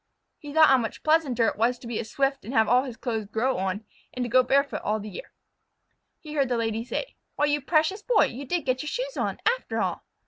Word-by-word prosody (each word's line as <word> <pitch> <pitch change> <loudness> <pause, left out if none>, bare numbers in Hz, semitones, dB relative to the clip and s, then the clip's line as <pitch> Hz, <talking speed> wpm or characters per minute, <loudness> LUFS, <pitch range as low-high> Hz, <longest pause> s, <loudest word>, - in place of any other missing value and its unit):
He 295 -2 -9
thought 315 +1 +6
how 265 -1 +6
much 225 -2 -5
pleasanter 305 -7 +3
it - - 0
was 240 +2 +2
to 240 - -14
be 235 -2 -3
a - - -2
Swift 270 +4 -1
and 235 +7 -6
have 220 -1 +4
all 250 +3 +4
his 245 -4 -7
clothes 225 -4 -3
grow 230 +2 0
on, 195 +3 -2 0.3
and 250 -1 -1
to - - -4
go 255 +2 +6
barefoot 280 +3 +1
all 215 +1 0
the 210 0 -7
year. - - -9 0.9
He 305 -1 -9
heard 275 -4 +1
the 245 - +1
Lady 225 0 -1
say: 260 - -5 0.2
"Why, 295 - +2
you 295 0 +1
precious 320 +7 +1
Boy! 440 -1 +4
You 270 +4 -6
did 340 +3 -2
get 255 0 0
your 300 - -4
shoes - - -3
on, - - -2
after - - 0
all." - - -2
255 Hz, 245 wpm, -26 LUFS, 230-300 Hz, 0.9 s, thought